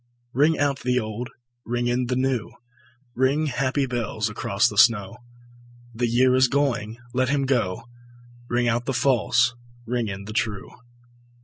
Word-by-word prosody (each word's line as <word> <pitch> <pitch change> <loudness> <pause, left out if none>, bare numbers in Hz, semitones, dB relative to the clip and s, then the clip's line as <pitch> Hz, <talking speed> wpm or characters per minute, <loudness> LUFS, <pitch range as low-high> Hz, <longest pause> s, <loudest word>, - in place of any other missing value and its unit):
Ring 150 +4 +3
out 140 -1 0
the 125 0 +1
old, 110 +2 -5 0.3
ring 120 0 -2
in 120 +1 0
the 125 - -1
new, 130 -3 0 0.6
Ring, 135 +5 +1
happy 135 +1 0
bells, 115 -3 -2
across 105 +1 +1
the - - -5
snow: 115 -1 +4 0.8
The 120 +1 0
year 125 +2 +3
is 130 0 +5
going, 120 -6 -1 0.2
let 130 0 +1
him 140 -1 +1
go; 120 -8 0 0.7
Ring 120 0 +1
out 120 +1 0
the 135 - -1
false, 125 -1 +2 0.3
ring 120 -1 -1
in 100 -1 -6
the 110 - -7
true. 110 -3 -2
125 Hz, 150 wpm, -24 LUFS, 115-130 Hz, 0.8 s, is